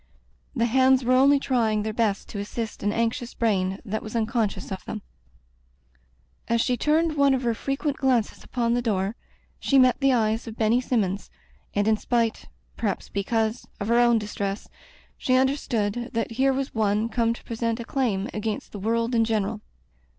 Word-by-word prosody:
The 230 Hz, -, +2 dB
hands 260 Hz, +2 st, +4 dB
were 255 Hz, -, +3 dB
only 275 Hz, +2 st, +5 dB
trying 225 Hz, -6 st, +1 dB
their 215 Hz, 0 st, -3 dB
best 210 Hz, -3 st, 0 dB
to 205 Hz, -, -5 dB
assist 215 Hz, +2 st, -5 dB
an 205 Hz, -, +1 dB
anxious 230 Hz, +2 st, -2 dB
brain 195 Hz, -4 st, 0 dB
that 215 Hz, 0 st, -3 dB
was 215 Hz, +1 st, -8 dB
un 225 Hz, -1 st, +2 dB
conscious 225 Hz, -4 st, -2 dB
of 190 Hz, -, -5 dB
them. 215 Hz, -2 st, -6 dB, 1.4 s
As 235 Hz, 0 st, +2 dB
she 250 Hz, +2 st, +2 dB
turned 310 Hz, +5 st, +1 dB
one 280 Hz, -1 st, +5 dB
of 260 Hz, -, -3 dB
her 235 Hz, -1 st, +1 dB
frequent 275 Hz, +4 st, -2 dB
glances 250 Hz, -5 st, 0 dB
upon 235 Hz, -2 st, -1 dB
the 245 Hz, -, +1 dB
door, 205 Hz, -2 st, -1 dB, 0.4 s
she 275 Hz, -, +2 dB
met 255 Hz, -1 st, +5 dB
the 275 Hz, -1 st, +3 dB
eyes 225 Hz, -1 st, +1 dB
of 225 Hz, 0 st, -7 dB
Benny 225 Hz, +3 st, +3 dB
Sinmions, 205 Hz, -6 st, -1 dB, 0.5 s
and 205 Hz, +1 st, +2 dB
in 220 Hz, -1 st, +4 dB
spite, 230 Hz, 0 st, 0 dB, 0.3 s
perhaps 210 Hz, -4 st, -2 dB
because, 220 Hz, +3 st, -1 dB
of 205 Hz, +1 st, -3 dB
her 235 Hz, +1 st, +4 dB
own 240 Hz, -1 st, +5 dB
distress, 205 Hz, -1 st, -3 dB, 0.5 s
she 255 Hz, -, +2 dB
understood 245 Hz, -4 st, 0 dB
that 230 Hz, 0 st, -1 dB
here 265 Hz, +4 st, +2 dB
was 270 Hz, 0 st, -2 dB
one 215 Hz, 0 st, +1 dB
come 230 Hz, 0 st, +1 dB
to -, -, -14 dB
present 230 Hz, 0 st, -2 dB
a 235 Hz, -, -5 dB
claim 225 Hz, -8 st, 0 dB
against 215 Hz, 0 st, -3 dB
the 205 Hz, -, -7 dB
world 230 Hz, +4 st, 0 dB
in 230 Hz, -1 st, +4 dB
general. 215 Hz, -1 st, -1 dB
230 Hz, 180 wpm, -25 LUFS, 215-250 Hz, 1.4 s, only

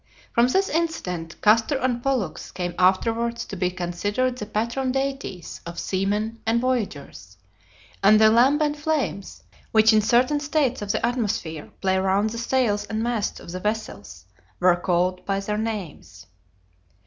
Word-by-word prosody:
From 235 Hz, +1 st, +4 dB
this 385 Hz, +9 st, +2 dB
incident, 190 Hz, -, -2 dB
Castor 225 Hz, +6 st, +4 dB
and 250 Hz, -2 st, -1 dB
Pollux 245 Hz, -, -2 dB
came 175 Hz, -1 st, -4 dB
afterwards 230 Hz, +6 st, +1 dB
to -, -, -7 dB
be 180 Hz, -1 st, 0 dB
considered 205 Hz, +8 st, -2 dB
the 210 Hz, -4 st, -6 dB
patron 235 Hz, +5 st, -1 dB
deities 270 Hz, -9 st, -4 dB
of 170 Hz, 0 st, -8 dB
seamen 210 Hz, +4 st, -1 dB
and 225 Hz, +1 st, +1 dB
voyagers, 155 Hz, -, -3 dB, 0.6 s
and 215 Hz, +2 st, +6 dB
the 220 Hz, 0 st, +6 dB
lambent 290 Hz, +6 st, +3 dB
flames, 295 Hz, -10 st, -2 dB, 0.3 s
which 220 Hz, 0 st, +5 dB
in 215 Hz, -, +5 dB
certain 250 Hz, +7 st, +3 dB
states 290 Hz, -4 st, 0 dB
of 205 Hz, -1 st, -2 dB
the 215 Hz, -, 0 dB
atmosphere 205 Hz, -10 st, -2 dB
play 190 Hz, -1 st, +2 dB
round 195 Hz, +3 st, +1 dB
the 230 Hz, -, -5 dB
sails 235 Hz, -4 st, +1 dB
and 215 Hz, +2 st, -3 dB
masts 235 Hz, -3 st, -2 dB
of -, -, -10 dB
vessels, 215 Hz, +2 st, -4 dB, 0.3 s
were 180 Hz, -1 st, +5 dB
called 180 Hz, +1 st, 0 dB
by 195 Hz, -1 st, -1 dB
their 210 Hz, +1 st, -2 dB
names. 185 Hz, -, -6 dB
220 Hz, 150 wpm, -24 LUFS, 190-250 Hz, 0.6 s, and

